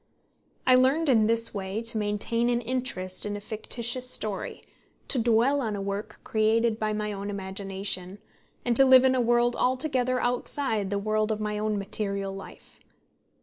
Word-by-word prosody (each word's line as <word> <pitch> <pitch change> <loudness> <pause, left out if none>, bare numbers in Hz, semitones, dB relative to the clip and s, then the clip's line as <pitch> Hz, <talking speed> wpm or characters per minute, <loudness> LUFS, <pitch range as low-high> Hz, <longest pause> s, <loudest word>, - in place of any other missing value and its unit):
I 255 - +6
learned 270 +5 +4
in 220 -4 +4
this 230 0 +1
way 200 +2 -4
to 230 -1 +2
maintain 210 +3 0
an 240 -1 +1
interest 240 -7 -3
in 205 0 -3
a - - -6
fictitious 235 +4 -2
story, 215 -5 -4 0.5
to 265 - +1
dwell 235 +5 +3
on 220 -4 -2
a - - -4
work 200 +1 -5
created 220 +1 +1
by 215 0 0
my 210 0 -2
own 200 0 -5
imagination, 195 -1 -3 0.5
and 240 -1 +1
to 270 - +8
live 260 -1 +7
in 260 - +4
a 255 - +2
world 240 0 +2
altogether 255 -1 +1
outside 245 -4 -1
the 200 - -1
world 215 +1 0
of 215 - -2
my 210 0 -2
own 215 0 -1
material 200 -1 -2
life. 195 - -12
220 Hz, 170 wpm, -27 LUFS, 205-245 Hz, 0.5 s, to